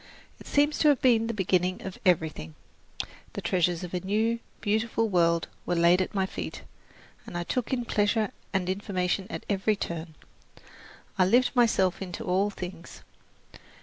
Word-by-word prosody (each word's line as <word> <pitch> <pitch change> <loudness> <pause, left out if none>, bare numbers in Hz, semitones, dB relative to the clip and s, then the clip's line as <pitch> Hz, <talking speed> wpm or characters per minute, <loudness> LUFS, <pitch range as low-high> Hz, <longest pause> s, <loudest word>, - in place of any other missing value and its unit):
It - - -13
seems 290 +1 +2
to 305 - +4
have 285 -4 +5
been 230 -3 +4
the - - 0
beginning 185 -3 0
of 190 - -7
everything. 155 - +1 0.8
The - - -4
treasures 175 -1 +1
of 180 - -7
a 180 - 0
new, 215 +5 0 0.2
beautiful 225 +2 0
world 170 -4 +2 0.2
were 175 - -1
laid 170 +2 +5
at 185 - -3
my 190 -1 +2
feet, 90 - -6 0.6
and 175 - -5
I 175 - -1
took 245 +6 -2
in 245 -2 0
pleasure 210 -1 +1 0.2
and 190 -3 0
information 190 -1 -1
at - - -6
every 205 +1 +1
turn. 165 -4 -5 1.0
I 185 - +6
lived 245 +7 +3
myself 220 -7 +3
into 180 -2 -5
all 190 +3 +1
things. 180 -3 -8
190 Hz, 160 wpm, -28 LUFS, 175-220 Hz, 1.0 s, I